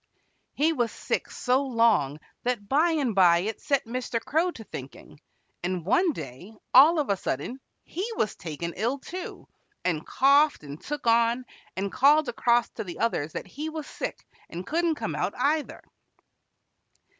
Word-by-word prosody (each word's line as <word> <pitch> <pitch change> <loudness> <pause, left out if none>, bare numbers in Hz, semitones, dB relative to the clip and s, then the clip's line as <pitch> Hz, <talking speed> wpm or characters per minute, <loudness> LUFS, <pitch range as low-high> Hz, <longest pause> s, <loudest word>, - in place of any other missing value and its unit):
He 315 +3 +2
was 240 -6 0
sick - - -3
so 255 +2 +1
long 230 - +2 0.2
that 240 -5 -2
by 305 +8 +3
and 290 -8 0
by 175 -3 +5
it 215 +3 -4
set 280 -3 +1
Mr. 240 0 -3
Crow 320 +9 +1
to 230 -10 -8
thinking, 135 -9 -10 0.4
and 180 -2 -3
one 350 - +3
day, 165 - -9 0.2
all 305 +6 +8
of 290 -9 +1
a - - +3
sudden, 190 - -4 0.2
he 380 +7 -4
was 215 - 0
taken 170 0 -5
ill, 235 +7 0
too, 360 +6 -8 0.4
and 165 -4 0
coughed 285 - +3
and 145 +1 -9
took 295 -2 -5
on, 235 +2 +3 0.3
and 195 +1 -2
called 290 +3 +4
across 240 0 +2
to - - -6
the 175 -4 -8
others 160 -10 -1
that - - -5
he 295 - -6
was 310 -2 -6
sick - - -6 0.2
and 175 +2 -6
couldn't 330 +3 +1
come 160 - -4
out, 180 +6 -2
either. 295 +4 0
235 Hz, 165 wpm, -27 LUFS, 185-290 Hz, 0.4 s, all